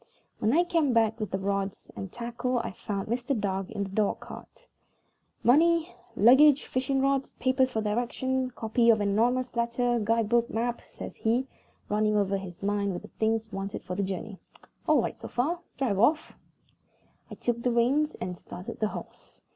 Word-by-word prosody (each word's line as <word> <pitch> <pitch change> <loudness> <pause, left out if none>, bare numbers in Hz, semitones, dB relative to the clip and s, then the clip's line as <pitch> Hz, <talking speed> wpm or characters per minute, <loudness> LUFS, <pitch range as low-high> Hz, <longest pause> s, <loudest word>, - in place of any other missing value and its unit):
When 215 - +2
I 340 +3 +5
came 330 -7 +1
back 225 -1 +2
with 215 -3 -3
the 190 - -1
rods 195 0 -2
and 195 -2 -6
tackle 240 +1 -2
I - - -2
found 200 +1 -4
Mr. 245 +2 -1
Dark 195 -2 -2
in 205 -3 -3
the 195 - -5
dog 205 0 0
cart. - - -12 0.8
"Money, 335 +6 +4 0.2
luggage, 265 +6 +6
fishing 265 +1 0
rods, 275 0 0
papers 260 0 +1
of 220 - +1
directions, 255 +4 -1
copy 230 +1 +1
of 220 -2 +6
anonymous 240 +5 +1
letter, 235 +1 +1
guide 225 0 +1
book, 235 +1 +2
map," 240 +1 -2
says - - -9
he, 235 +4 +1 0.4
running 210 0 +1
over 200 -1 +1
in 195 - -2
his 180 -1 -10
mind 200 -1 0
the 210 - -13
things 220 0 0
wanted 195 +1 -4
for 180 - -5
the 200 - -1
journey 195 +1 -4 0.5
"all 305 -6 +4
right - - -4
so - - -7
far. 300 +9 -1 0.2
Drive 230 -8 0
off." 300 +8 +2 1.0
I - - -8
took 235 -1 -2
the 245 - +1
reins 265 +6 +2
and 180 -1 -5
started 180 +2 -8
the 215 - +2
horse. - - -10
235 Hz, 180 wpm, -28 LUFS, 205-255 Hz, 1.0 s, luggage